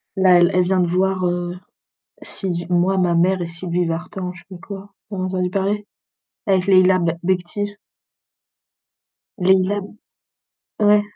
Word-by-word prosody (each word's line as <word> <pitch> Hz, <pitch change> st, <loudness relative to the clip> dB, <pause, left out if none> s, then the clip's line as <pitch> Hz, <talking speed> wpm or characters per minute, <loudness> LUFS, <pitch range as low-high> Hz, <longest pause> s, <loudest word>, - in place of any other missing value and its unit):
Là 185 Hz, -2 st, +5 dB
elle 175 Hz, +1 st, +4 dB
elle 180 Hz, -, +4 dB
vient 185 Hz, +1 st, +1 dB
de 180 Hz, -, +3 dB
voir, 185 Hz, +1 st, +1 dB
heu, 175 Hz, 0 st, -2 dB, 0.7 s
si 175 Hz, -3 st, -4 dB
moi 180 Hz, +2 st, +2 dB
ma 175 Hz, -2 st, +2 dB
mère 185 Hz, +2 st, +2 dB
et -, -, -2 dB
Sylvie 170 Hz, +1 st, -2 dB
Vartan, 180 Hz, +2 st, -4 dB
je 175 Hz, -, -13 dB
sais -, -, -22 dB
pas -, -, -15 dB
quoi. 200 Hz, 0 st, -9 dB, 0.2 s
Vous 200 Hz, -, -5 dB
en 185 Hz, -, -2 dB
avez 185 Hz, -, -5 dB
entendu 180 Hz, 0 st, 0 dB
parler? 200 Hz, +2 st, -1 dB, 0.6 s
Avec 190 Hz, -2 st, +2 dB
Leila 185 Hz, -1 st, +5 dB
B 170 Hz, -1 st, +1 dB
Bekhti. 190 Hz, +3 st, -2 dB, 1.7 s
Leila 190 Hz, +2 st, +3 dB, 1.0 s
ouais. 210 Hz, 0 st, +5 dB
185 Hz, 155 wpm, -20 LUFS, 175-195 Hz, 1.7 s, Là